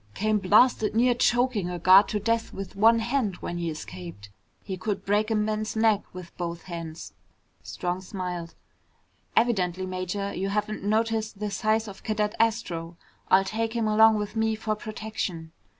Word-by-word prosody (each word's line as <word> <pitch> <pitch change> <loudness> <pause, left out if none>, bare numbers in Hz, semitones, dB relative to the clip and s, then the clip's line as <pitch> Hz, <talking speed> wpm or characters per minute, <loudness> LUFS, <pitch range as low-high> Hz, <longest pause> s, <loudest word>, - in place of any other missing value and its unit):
Came 215 0 +1
blasted 215 +2 +4
near 245 +2 +4
choking 240 -5 +1
a 180 - -4
guard 185 +4 +7
to 210 - -1
death 230 +2 0
with 195 -1 -7
one 225 +3 +5
hand 230 -3 0
when 175 0 -5
he 170 -1 -2
escaped. 100 - -8 0.3
He 190 - -4
could 195 +2 -3
break 210 +2 +1
a 220 - +1
man's 215 +1 -1
neck 220 -2 +3
with 180 -2 -10
both 170 -1 -4
hands." 165 -2 -7 0.5
Strong 180 +1 -4
smiled. 180 -3 -5 0.8
"Evidently, 190 -6 +1
Major, 185 +2 -3
you 195 +2 -2
haven't 210 +1 -2
noticed 220 0 0
the 210 0 -3
size 215 +3 0
of 195 -2 -10
Cadet 210 -1 -1
Astro. 180 -7 -1 0.3
I'll 190 +1 +6
take 225 +2 -2
him 230 -2 0
along 220 +1 +6
with 210 +1 -4
me 220 0 +1
for 215 0 -2
protection." 210 -6 -5
210 Hz, 165 wpm, -26 LUFS, 180-220 Hz, 0.8 s, guard